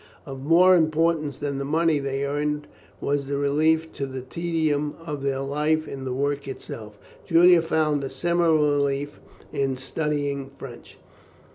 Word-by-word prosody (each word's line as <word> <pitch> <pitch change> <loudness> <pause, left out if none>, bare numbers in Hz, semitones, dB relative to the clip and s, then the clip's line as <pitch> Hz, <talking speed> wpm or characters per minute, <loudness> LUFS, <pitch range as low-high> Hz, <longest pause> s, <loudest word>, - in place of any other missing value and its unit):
Of 135 -3 -8
more 175 +5 +6
importance 155 -3 +1
than 140 -2 -3
the - - -2
money 155 +1 +2
they 140 0 -2
earned, 150 +1 -2 0.3
was 140 -1 -1
the 140 0 -1
relief 155 +3 +1
to 140 - -4
the 130 -1 -6
tedium 155 0 -1
of 150 -3 -4
their 135 -1 -1
life 150 +3 0
in 135 -1 -6
the 130 - -3
work 140 +2 -1
itself. 110 -5 -8 0.3
Julian 175 +1 +6
found 155 -3 0
a 135 - -3
similar 170 +3 +2
relief 145 -1 0 0.3
in 135 -2 0
studying 140 0 -2
French. 130 -3 -11
145 Hz, 150 wpm, -24 LUFS, 140-160 Hz, 0.3 s, more